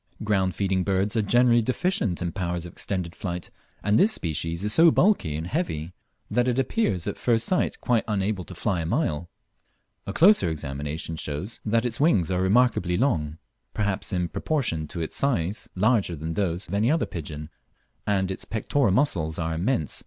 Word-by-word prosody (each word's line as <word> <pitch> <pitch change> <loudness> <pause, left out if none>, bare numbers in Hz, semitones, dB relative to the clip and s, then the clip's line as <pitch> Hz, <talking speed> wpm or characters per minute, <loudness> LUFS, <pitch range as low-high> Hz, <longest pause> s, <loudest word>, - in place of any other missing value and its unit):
Ground 95 -4 +1
feeding 95 -2 0
birds 100 +3 0
are 110 - +3
generally 120 +3 +4
deficient 125 - 0
in 85 - -2
power 90 -2 -2
of 85 0 -4
extended 90 0 -4
flight, 90 -2 -5 0.3
and 105 +3 +3
this 215 - +5
species 80 - -2
is 105 +1 +2
so 165 +1 +7
bulky 160 - +2
and 80 +2 -4
heavy 90 - -3 0.3
that 125 0 +1
it 125 0 +1
appears 130 - 0
at 100 - -4
first 115 -2 +2
sight 185 - 0
quite 120 -3 +2
unable 100 -2 -1
to 90 - -9
fly 90 0 -1
a - - -3
mile. 85 - -1 0.8
A - - -2
closer 180 - +5
examination 75 +2 -4
shows, 75 +9 -4
however, - - -6
that 115 +1 +3
its 115 -2 0
wings 105 - +3
are 90 0 +1
remarkably 95 -3 +2
large, 80 - +1 0.4
perhaps 105 -2 -1
in 90 -2 0
proportion 85 - -1
to 85 - -5
its 80 - -4
size 105 -9 -1
larger 105 -3 +2
than 80 +2 -4
those 90 -1 -2
of 85 - -8
any 105 +4 +2
other 160 +2 +2
pigeon, 75 -2 -7 0.6
and 95 -2 +1
its 95 - -5
pectoral 115 +3 0
muscles 90 - +1
are 80 -1 -2
immense. 85 - -1
95 Hz, 180 wpm, -25 LUFS, 85-120 Hz, 0.8 s, so